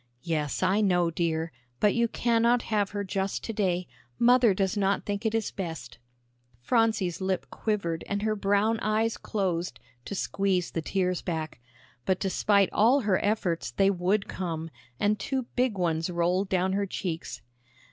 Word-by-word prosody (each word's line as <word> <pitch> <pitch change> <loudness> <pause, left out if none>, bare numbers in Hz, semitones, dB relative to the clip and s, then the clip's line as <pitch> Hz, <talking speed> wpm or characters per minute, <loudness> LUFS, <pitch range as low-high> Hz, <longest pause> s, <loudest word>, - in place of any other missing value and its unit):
"Yes, 155 -1 -1
I 190 +3 +3
know, 175 -4 +2
dear. 165 -1 -1 0.3
But 210 - +4
you 235 0 +2
cannot 235 +1 +2
have 205 -2 0
her 205 -1 -3
just 195 0 -2
to 225 - -4
day. 185 -4 0 0.3
Mother 240 - +5
does 190 +1 0
not 200 -1 +1
think 205 +2 -1
it 220 - -1
is 225 -2 -1
best." 160 -10 -6 0.6
Phronsie's 215 - +1
lip 190 -1 -1
quivered 185 -7 -2
and 200 0 -2
her 215 0 +1
brown 205 +2 +2
eyes 220 +1 +1
closed 180 -4 -2 0.3
to 200 - -5
squeeze 190 -2 0
the 165 - -2
tears 180 +1 -1
back. 160 -7 -4 0.4
But 185 +5 +1
despite 200 0 +2
all 245 +7 +4
her 200 -5 +1
efforts 195 -5 0
they 195 0 +3
would 195 +2 0
come, 165 -3 -4 0.3
and 210 0 +2
two 265 +3 -1
big 250 -5 +1
ones 165 -1 0
rolled 180 +3 0
down 185 0 +1
her 200 0 0
cheeks. 175 -3 -5
195 Hz, 160 wpm, -28 LUFS, 175-215 Hz, 0.6 s, Mother